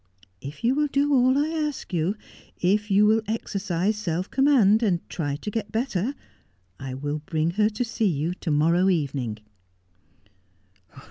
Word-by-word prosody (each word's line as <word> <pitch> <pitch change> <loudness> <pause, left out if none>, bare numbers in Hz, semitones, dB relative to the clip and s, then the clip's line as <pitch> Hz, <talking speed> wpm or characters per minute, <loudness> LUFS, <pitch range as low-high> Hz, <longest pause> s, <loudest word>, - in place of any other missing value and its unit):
If 145 - -9
you 240 +3 +3
will 295 +2 +1
do 285 +1 +1
all 260 0 +4
I 295 +2 +1
ask 300 - -3
you, 175 +4 0 0.4
if 205 +4 +1
you 205 +1 +5
will 220 +1 +4
exercise 200 -2 -1
self 180 -2 -3
command, 250 -7 +4
and 185 -7 0
try 145 -5 -2
to 210 +8 -6
get 205 -1 -4
better, 230 +1 -1 0.6
I 135 -1 -6
will 145 +3 -3
bring 160 +1 0
her 210 +4 +2
to 225 +3 -3
see 225 -1 0
you 160 +2 -1
to 180 - -6
morrow 165 +5 +3
evening.' 135 - -1
200 Hz, 155 wpm, -25 LUFS, 165-230 Hz, 0.6 s, you